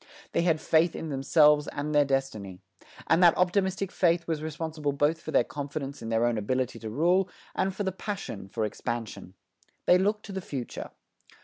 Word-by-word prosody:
They - - +1
had 165 -2 +2
faith 160 +2 +2
in 160 - -5
themselves 150 +2 +4
and 150 +1 -3
their 145 -1 +5
destiny. 130 -9 -2 0.5
And 165 +2 +3
that 175 -2 +6
optimistic 190 +1 +1
faith 170 -1 +2
was 160 -2 -1
responsible 155 -2 -3
both 150 +3 +1
for - - -8
their - - +4
confidence 140 -1 -5
in 115 - -5
their 115 +1 +2
own 120 -2 +1
ability 130 +4 -1
to 110 - -6
rule 175 - +2 0.2
and 195 - 0
for 205 - -2
the 190 - -1
passion 190 - -6
for 110 +2 -2
expansion. 110 -4 -5 0.5
They 180 - +6
looked 210 +3 0
to - - -8
the 190 0 -4
future. 135 -8 -6
150 Hz, 185 wpm, -28 LUFS, 130-175 Hz, 0.5 s, that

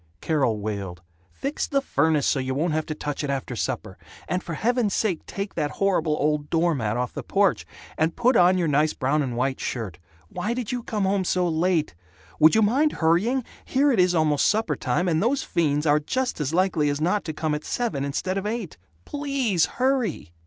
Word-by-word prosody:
Carol 130 - 0
wailed, 100 -4 -5 0.3
"Fix 275 +2 -3
the 275 - +1
furnace 155 - +1
so 140 - +2
you 130 0 -2
won't 155 +3 0
have 155 0 -1
to 155 - -3
touch 145 -1 -4
it 145 - -3
after 135 -2 -3
supper. - - -4 0.3
And 180 +2 -1
for 170 -4 -5
heaven's 235 +2 +1
sake 195 -7 0
take 200 0 -5
that 145 - -1
horrible 170 -6 +1
old 150 0 0
door 170 0 +2
mat 110 -5 -1
off 125 -1 -2
the - - -4
porch. - - +1 0.3
And 160 +1 +1
put 245 +2 +3
on 180 +1 +5
your 175 -2 +1
nice 150 +1 +2
brown 140 +4 0
and 125 -4 -3
white 130 +2 0
shirt. 110 -8 -4 0.3
Why 230 - -3
did 245 -4 -3
you 245 -1 -2
come 215 -3 -2
home 195 0 +1
so 180 0 +1
late? 165 -1 +1 0.5
Would 155 +4 +6
you 220 - +4
mind 275 +9 +2
hurrying? 195 +11 +2 0.2
Here 280 +2 +2
it 235 - +1
is 180 -1 +4
almost 155 -3 +3
suppertime, 210 -4 0
and 160 -2 +1
those 260 +6 +1
fiends 150 -2 0
are 150 0 +4
just 250 - -2
as 145 -1 -1
likely 170 -4 +2
as 145 0 -1
not 180 +6 +1
to 160 - -3
come 155 0 -2
at 150 - -3
seven 200 - -2
instead 185 +7 -2
of 200 - -4
eight. 215 -6 -4 0.3
PLEASE 275 - 0
hurry!" 255 - 0
165 Hz, 205 wpm, -24 LUFS, 145-210 Hz, 0.5 s, Would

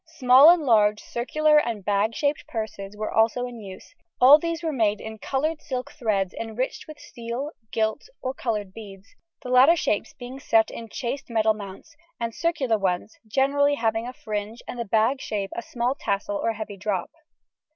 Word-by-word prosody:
Small 260 +3 +8
and 345 -2 +5
large 210 -5 +4
circular 300 +5 +2
and 225 -8 -3
bag 210 +2 +1
shaped 290 0 -1
purses 210 -3 -6
were 215 0 -3
also 230 +3 +2
in 245 -2 -8
use; 190 - -11 0.3
all 275 +4 +9
these 335 +1 -3
were 320 -2 -1
made 215 -5 +1
in 220 0 -8
coloured 300 +7 -2
silk 255 +2 -5
threads 210 -10 -1
enriched 230 +3 -4
with 310 -1 -10
steel, 240 +5 -6 0.2
gilt, 220 - -1
or 260 - -3
coloured 210 -7 -3
beads, 200 -3 -11 0.3
the 250 - -6
latter 260 +6 +6
shapes 210 -10 -1
being 250 +2 -8
set 225 -5 +2
in 230 -1 -8
chased 255 +6 -5
metal 220 -1 +2
mounts, 205 +9 -10 0.2
the 230 -1 -2
circular 265 -6 0
ones 185 +2 -2
generally 280 +4 +2
having 225 -2 -1
a 250 - -6
fringe 215 0 -5
and 245 - -6
the 235 - -2
bag 225 +6 +1
shape 200 -2 -3
a - - -3
small 240 +2 -1
tassel 200 -5 -2
or 225 +3 0
heavy 215 -2 -7
drop. 190 -2 -2
230 Hz, 180 wpm, -25 LUFS, 210-270 Hz, 0.3 s, all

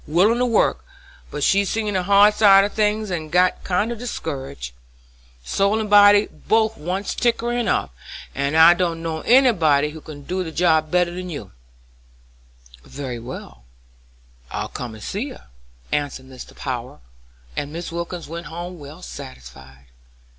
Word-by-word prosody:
Willin' 195 +10 +3
to 250 - +2
work, 215 - +2 0.5
but 145 - -4
she's 200 +3 +3
seen 215 -2 -1
the 185 - +1
hard 200 +3 +5
side 195 -2 +6
of 205 - -2
things 215 -1 0
and 155 -3 -4
got 180 +1 +2
kind 200 +5 0
of 235 - -5
discouraged. 135 - -6 0.7
Soul 200 - +1
and 215 -2 -4
body 205 0 +7
both 220 0 0
wants 185 +5 -3
tinkerin' 240 -1 0
up, 70 - 0 0.4
and 140 +3 -1
I 165 +2 +9
don't 170 -2 -2
know 160 -1 -3
anybody 170 - +4
who 160 0 -10
can 145 -2 -10
do 185 +5 -2
the 165 - -6
job 160 -2 +2
better 180 +1 +2
'n 180 0 -6
you 145 - -7 1.3
can." - - -20
"Very 130 -4 -5
well, 115 - -10 0.8
I'll - - -4
come 120 -3 -6
and 110 - -11
see 225 +9 -3
her," 260 - -13 0.4
answered 145 -3 -2
Mr. 130 -1 -12
Power, 125 - -5 0.5
and 145 - -3
Mrs. 170 +2 -6
Wilkins 170 0 -5
went 165 +1 -7
home 175 +2 -7
well 150 +5 -11
satisfied. 65 - -11
170 Hz, 160 wpm, -22 LUFS, 145-205 Hz, 1.3 s, I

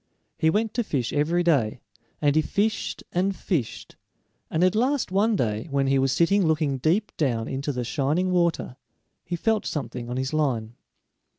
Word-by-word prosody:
He 160 -1 +4
went 215 +5 0
to 240 - 0
fish 130 - -2
every 165 +4 +1
day, 130 -10 +2 0.4
and 145 0 +3
he 155 - +5
fished 210 +7 -1
and 190 +2 0
fished, 155 - -3 0.5
and 160 - +1
at 185 0 +4
last 250 0 +1
one 210 +4 +2
day, 110 - -1
when 140 -1 +1
he 135 0 +2
was 135 0 +2
sitting 195 +7 +3
looking 150 -4 +1
deep 180 - +1
down 120 -7 0
into 140 +2 -2
the 125 -2 -3
shining 150 +9 0
water, 170 -7 0 0.5
he 175 - -3
felt 220 +5 +1
something 125 -5 -4
on 125 - -3
his 130 +3 -2
line. 125 -8 0
155 Hz, 175 wpm, -25 LUFS, 130-185 Hz, 0.5 s, he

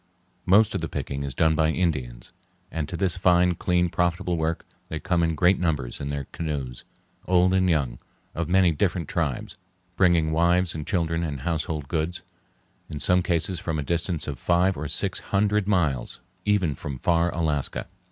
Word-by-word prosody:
Most 105 +4 +5
of - - -2
the - - -3
picking 70 0 -4
is 70 -3 -4
done 80 0 +3
by 80 0 +2
Indians, 75 -8 -2 0.4
and 80 -2 -3
to 85 - -4
this 90 0 0
fine, 90 0 +4
clean, 90 +1 +1
profitable 90 +1 0
work 80 0 -2 0.2
they 80 - -4
come 90 -1 0
in 80 -1 +1
great 90 +4 +3
numbers 75 -8 -1
in 70 - -3
their 70 0 -3
canoes, 70 -6 -4 0.4
old 90 0 +4
and 95 -1 +3
young, 70 -8 0 0.3
of 85 0 -3
many 90 -1 +4
different 85 0 -1
tribes, 105 -2 -3 0.4
bringing 85 -4 +3
wives 85 +2 +2
and 75 -2 -6
children 85 -4 0
and 70 -5 -4
household 80 -2 -2
goods, 85 +4 -2 0.7
in 75 - -5
some 90 +4 +3
cases 85 +1 0
from 80 -2 -3
a 75 - -2
distance 85 +1 -1
of 70 -4 -5
five 90 +2 +2
or 75 +1 -4
six - - -1
hundred 105 0 +1
miles, 80 -11 0 0.3
even 100 -7 +2
from 70 0 -6
far 85 +1 +2
Alaska. 75 -4 -1
85 Hz, 175 wpm, -25 LUFS, 75-90 Hz, 0.7 s, Most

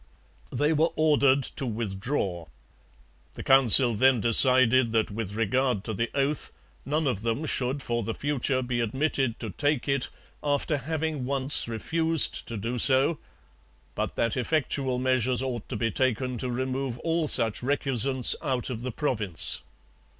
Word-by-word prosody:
They 150 +2 0
were 160 +2 +2
ordered 140 -3 +2
to 130 - -4
withdraw. 100 - -4 0.9
The - - -9
Council 130 -2 +6
then 130 +3 +3
decided 125 +1 +5
that 110 -2 0
with 105 -1 -5
regard 115 0 0
to 110 - -5
the 115 +4 -2
oath 140 +1 -2 0.4
none 155 +2 -1
of 120 -7 -1
them 115 +7 -2
should 135 -1 -2
for 120 0 -2
the 115 +1 -4
future 135 -2 -1
be 125 -1 -3
admitted 130 +1 -1
to 110 -4 -5
take 145 +1 -2
it 140 -2 0 0.3
after 145 +1 -1
having 155 -1 -3
once 135 0 +2
refused 160 +7 0
to 115 - -6
do 115 +4 -4
so, 135 +6 +2 0.7
but - - -4
that 115 -1 -1
effectual 135 -1 -1
measures 130 0 0
ought 120 -4 -5
to - - -5
be 115 -1 -1
taken 125 +1 -1
to 130 - -3
remove 130 0 -3
all 165 -1 -1
such 115 -6 +1
recusants 130 -1 +3
out 130 -1 -3
of 115 -2 -6
the 130 +1 -4
province. 110 - 0
130 Hz, 150 wpm, -26 LUFS, 115-140 Hz, 0.9 s, Council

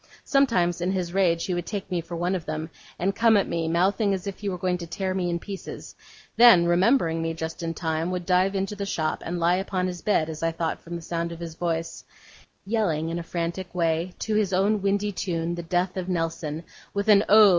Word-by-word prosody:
Sometimes 180 - +2
in 180 +2 +1
his 180 -2 -2
rage 175 -4 +2
he 185 - -1
would 175 -1 -3
take 200 -2 -5
me 175 -2 0
for 170 +1 -7
one 175 +2 0
of 180 -4 -3
them, 155 +1 -4 0.3
and 195 +2 0
come 225 -1 +5
at 200 - +1
me, 165 -1 -1
mouthing 195 +4 +2
as 185 - -7
if 200 -1 -5
he 205 - -2
were 185 - -3
going 180 0 -1
to 170 - -6
tear 185 +3 -2
me 180 -2 -1
in 170 - 0
pieces; 195 +3 -8 0.4
then, 230 -8 +8
remembering 175 -1 +3
me, 165 0 -2
just 160 0 -5
in 165 0 -3
time, 160 +1 -1
would 180 -1 -3
dive 185 +2 +2
into 195 +1 -1
the 200 - -4
shop, 155 -5 -1
and 175 +1 -3
lie 175 +2 +3
upon 190 -1 -1
his 180 -1 -4
bed, 180 -7 +2
as 160 -1 -6
I 165 0 0
thought 165 0 -2
from 170 +1 -7
the 170 - -6
sound 170 0 -2
of 170 - -8
his 170 -1 -6
voice, 165 0 -3 0.6
yelling 185 -8 0
in 170 +1 -2
a - - -3
frantic 170 +2 -4
way, 165 +1 0
to 220 - -2
his 210 -3 +1
own 200 +3 +2
windy 200 +1 +1
tune, 170 -3 -2
the 175 - -4
'Death 180 +2 -1
of 185 -1 -3
Nelson'; 165 -2 -2 0.3
with 200 +1 -1
an 205 -1 +7
Oh! 215 0 +8
175 Hz, 235 wpm, -25 LUFS, 165-195 Hz, 0.6 s, then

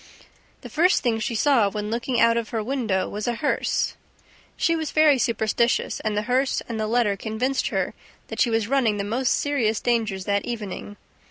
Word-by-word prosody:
The - - -9
first 355 +5 +3
thing 230 -3 +1
she 230 +1 -2
saw, 235 -4 +3
when 210 +1 -4
looking 235 +1 -1
out 230 0 +5
of 235 -2 -2
her 225 -3 -2
window, 225 -6 -1
was 210 +2 -5
a 240 - 0
hearse. 290 - 0 0.6
She 330 - +2
was 315 -2 -2
very 305 -3 +4
superstitious; 230 0 0
and 215 -1 -2
the 210 - 0
hearse 255 +3 +1
and 230 -2 -4
the 215 - -1
letter 225 -3 +2
convinced 225 +7 -1
her - - -1 0.4
that - - -3
she 245 - +4
was 225 -2 0
running 240 -5 +2
the 200 - -2
most 245 +5 0
serious 240 -7 0
dangers 220 -6 -1
that 200 0 0
evening. 205 -3 -6
230 Hz, 190 wpm, -24 LUFS, 215-255 Hz, 0.6 s, out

